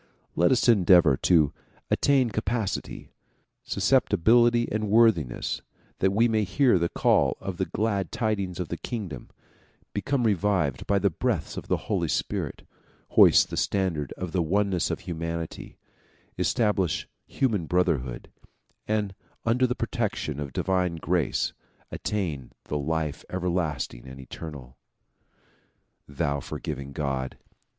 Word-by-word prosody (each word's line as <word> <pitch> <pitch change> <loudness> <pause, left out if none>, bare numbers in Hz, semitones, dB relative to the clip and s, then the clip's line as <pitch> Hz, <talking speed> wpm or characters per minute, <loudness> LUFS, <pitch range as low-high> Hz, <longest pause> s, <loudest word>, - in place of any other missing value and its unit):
Let 85 - +3
us 130 - +3
endeavor 90 - +6
to 80 0 +3 0.4
attain 135 -4 +3
capacity, 105 0 -3 0.5
sus 100 - -4
ceptibility 120 0 +4
and 110 -1 -1
worthiness, 105 - +2 0.4
that 95 - +3
we 110 +5 +3
may 110 -2 +1
hear 120 0 +3
the 85 0 0
call - - +2
of 95 -2 -5
the 95 - -1
glad 100 -4 -1
tidings 105 -6 -2
of 90 - -3
the 85 - -3
kingdom, 95 - -6 0.6
become 130 +5 0
revivified 95 - +1
by 100 - +3
the 100 -1 +2
breaths - - -2
of - - -7
the - - +1
Holy - - 0
Spirit, - - -2 0.4
hoist - - +6
the - - -4
standard 90 -8 0
of 90 -2 -6
the 90 - +1
oneness 95 +1 +1
of - - -3
humanity, 85 -1 -5 0.6
establish 105 -6 0 0.2
human 105 - 0
brotherhood, 70 -9 0 0.6
and 105 -2 0 0.3
under 125 +3 +3
the 125 - -1
protection 75 -2 -2
of 70 -2 -5
divine 90 +2 0
grace 85 -1 0 0.4
attain 80 -11 -3
the - - -5
life 80 0 -2
everlasting 85 -9 -2
and 65 +1 -10
eternal. 65 -1 -9 1.3
thou 70 0 -1
forgiving 70 0 -6
God 70 -3 -3
90 Hz, 125 wpm, -26 LUFS, 75-105 Hz, 1.3 s, endeavor